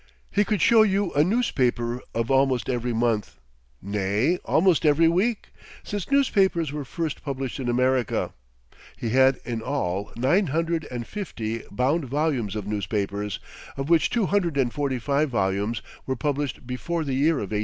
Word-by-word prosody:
He 205 Hz, -, +3 dB
could 210 Hz, -4 st, 0 dB
show 230 Hz, -2 st, +6 dB
you 200 Hz, -3 st, +2 dB
a 145 Hz, -, +4 dB
newspaper 125 Hz, -, 0 dB
of 115 Hz, +2 st, -1 dB
almost 135 Hz, -3 st, +2 dB
every 120 Hz, 0 st, -1 dB
month 115 Hz, -2 st, -1 dB, 0.4 s
nay, 105 Hz, -, +1 dB
almost 175 Hz, 0 st, +3 dB
every 155 Hz, +2 st, +5 dB
week, 200 Hz, +7 st, +1 dB, 0.3 s
since 205 Hz, -3 st, -4 dB
newspapers 195 Hz, -, +2 dB
were 150 Hz, -1 st, -3 dB
first 155 Hz, +3 st, -4 dB
published 135 Hz, -1 st, -4 dB
in 125 Hz, -2 st, -2 dB
America. 125 Hz, -1 st, +1 dB, 0.6 s
He 115 Hz, -, -3 dB
had 130 Hz, +2 st, +4 dB
in 115 Hz, -2 st, -3 dB
all 100 Hz, -7 st, -2 dB
nine 160 Hz, -, +2 dB
hundred 165 Hz, +2 st, -1 dB
and 120 Hz, -2 st, -5 dB
fifty 115 Hz, -, -4 dB
bound 135 Hz, +8 st, 0 dB
volumes 135 Hz, -6 st, -1 dB
of 105 Hz, -2 st, -4 dB
newspapers, 100 Hz, 0 st, -2 dB, 0.4 s
of 135 Hz, +4 st, -3 dB
which 165 Hz, -2 st, +4 dB
two 235 Hz, -4 st, +1 dB
hundred 180 Hz, -7 st, 0 dB
and 125 Hz, -3 st, +1 dB
forty 140 Hz, -3 st, -1 dB
five 140 Hz, +4 st, 0 dB
volumes 100 Hz, 0 st, -1 dB, 0.2 s
were 130 Hz, -, 0 dB
published 145 Hz, -3 st, -2 dB
before 160 Hz, +7 st, -3 dB
the 140 Hz, -3 st, -2 dB
year 150 Hz, +5 st, +3 dB
1800. 105 Hz, -2 st, -2 dB
135 Hz, 160 wpm, -25 LUFS, 115-165 Hz, 0.6 s, show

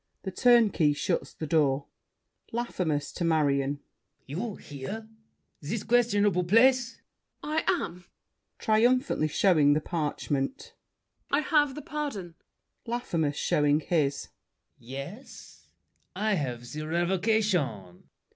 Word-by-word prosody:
The 190 Hz, -, -4 dB
Turnkey 215 Hz, -, +4 dB
shuts 145 Hz, -, -2 dB
the 155 Hz, -, -6 dB
door. 145 Hz, -3 st, +2 dB, 0.7 s
LAFFEMAS 180 Hz, -11 st, -2 dB
(to 175 Hz, -, -3 dB
Marion). 145 Hz, -3 st, +1 dB, 0.4 s
You 190 Hz, -, -4 dB
here? 175 Hz, +11 st, -7 dB, 0.5 s
This 195 Hz, +9 st, -3 dB
questionable 205 Hz, -6 st, +2 dB
place! 245 Hz, +6 st, +3 dB, 0.4 s
MARION. 310 Hz, +1 st, -1 dB
I 360 Hz, -, +2 dB
am. 175 Hz, +1 st, -12 dB, 0.5 s
[Triumphantly 235 Hz, -, +2 dB
showing 155 Hz, -3 st, +4 dB
the 150 Hz, -, +2 dB
parchment. 150 Hz, -, -3 dB, 0.6 s
I 285 Hz, -, +2 dB
have 295 Hz, -4 st, +2 dB
the 300 Hz, -, -7 dB
pardon! 275 Hz, -, -4 dB, 0.5 s
LAFFEMAS 170 Hz, -, -1 dB
(showing 145 Hz, 0 st, +2 dB
his). 145 Hz, -4 st, 0 dB, 0.5 s
Yes? 140 Hz, -, -10 dB, 0.5 s
I 215 Hz, 0 st, +1 dB
have 130 Hz, -9 st, -2 dB
The 155 Hz, 0 st, -5 dB
revocation! 175 Hz, -, 0 dB
175 Hz, 105 wpm, -28 LUFS, 145-230 Hz, 0.7 s, Turnkey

